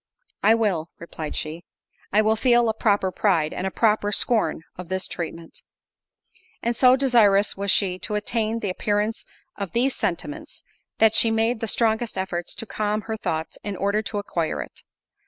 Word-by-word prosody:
"I 220 +3 +5
will," 190 -8 0
replied 160 -2 -7
she, 160 +3 -3 0.5
"I 215 +2 +4
will 220 +1 +3
feel 240 0 +3
a - - +1
proper 205 -3 +1
pride—and 180 -2 0
a - - 0
proper 210 0 +1
scorn 210 -7 0
of 180 -1 -9
this 190 0 -2
treatment." 165 -1 -7 1.0
And 235 +1 0
so 255 +1 +6
desirous 220 -7 +4
was 200 +1 -3
she 185 -2 +2
to 210 - -3
attain 225 +1 -1
the 200 - -1
appearance 210 +3 -1 0.3
of 200 -3 -5
these 250 +3 +1
sentiments, 300 - -4 0.3
that 220 -1 +5
she 225 - +5
made 225 +1 +1
the 225 - -3
strongest 225 +1 +1
efforts 180 -2 -3
to - - -5
calm 215 -1 -2
her 220 +1 -4
thoughts, 160 -6 -4
in 205 -1 -4
order 200 +3 0
to 215 -1 -5
acquire 170 -5 -2
it. - - -15
210 Hz, 170 wpm, -24 LUFS, 185-225 Hz, 1.0 s, so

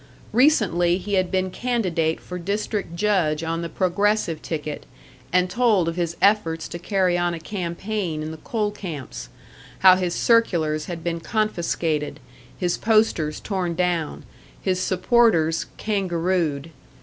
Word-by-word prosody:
Recently 205 - +3
he 200 +2 -5
had 185 -2 +2
been 185 0 0
candidate 180 -10 0
for 180 0 -7
district 200 -1 -3
judge 170 -6 +1
on 165 +1 -2
the 170 - -4
Progressive 190 -1 0
ticket, 150 -2 -5 0.4
and 180 +1 +3
told 210 -4 +2
of 165 - -1
his 170 -1 -2
efforts 165 -6 +2
to 170 - -6
carry 185 -1 +1
on 175 -1 0
a - - -7
campaign 175 -1 -3
in 155 - -5
the 160 - -8
coal 210 +6 -2
camps 145 - -7 0.5
how 185 -1 +9
his 180 -2 -1
circulars 165 -10 +2
had 170 -2 -6
been 170 0 -2
confiscated, 165 -8 -1 0.4
his 175 -1 -1
posters 215 -9 +2
torn 185 -4 -2
down, 175 -3 -1 0.4
his 185 -2 0
supporters 185 -4 +2
"kangarooed." 175 -6 -1
180 Hz, 135 wpm, -23 LUFS, 165-205 Hz, 0.5 s, how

